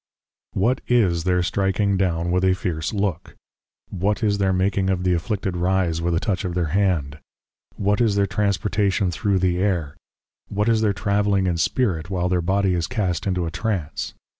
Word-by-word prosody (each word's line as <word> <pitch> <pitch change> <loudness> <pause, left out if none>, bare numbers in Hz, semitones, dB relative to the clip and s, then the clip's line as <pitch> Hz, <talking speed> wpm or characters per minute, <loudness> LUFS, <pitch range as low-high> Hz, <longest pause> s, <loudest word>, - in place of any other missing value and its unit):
What 120 +7 +1
is 95 -9 +2
their 90 -1 +2
stricking 95 +3 0
down 85 -2 0
with 90 +1 +1
a 95 0 +3
fierce 80 -4 -3
Look? 100 -5 -2 0.6
What 105 +5 -1
is 100 -1 +1
their 95 -1 +2
making 95 +1 +1
of 90 -1 0
the 90 -1 +2
Afflicted 95 +2 -2
Rise, 90 -2 0
with 85 0 0
a - - +2
touch 100 -4 -1
of 90 -2 -3
their 85 -4 -1
Hand? 75 -7 0 0.6
What 100 +2 +1
is 110 -4 +2
their 100 0 +3
Transportation 100 -1 0
thro' 100 +3 0
the 90 -1 +1
Air? 90 -7 -1 0.5
What 105 +1 -1
is 110 -1 +3
their 105 -2 +3
Travelling 100 -1 +1
in 90 -2 0
Spirit, 90 -4 0
while 90 -2 -1
their 90 -1 +1
Body 95 +2 +1
is 85 -2 -1
cast 100 -8 -2
into 90 -2 0
a 80 - -4
Trance? 90 -4 -3
95 Hz, 185 wpm, -22 LUFS, 90-100 Hz, 0.6 s, a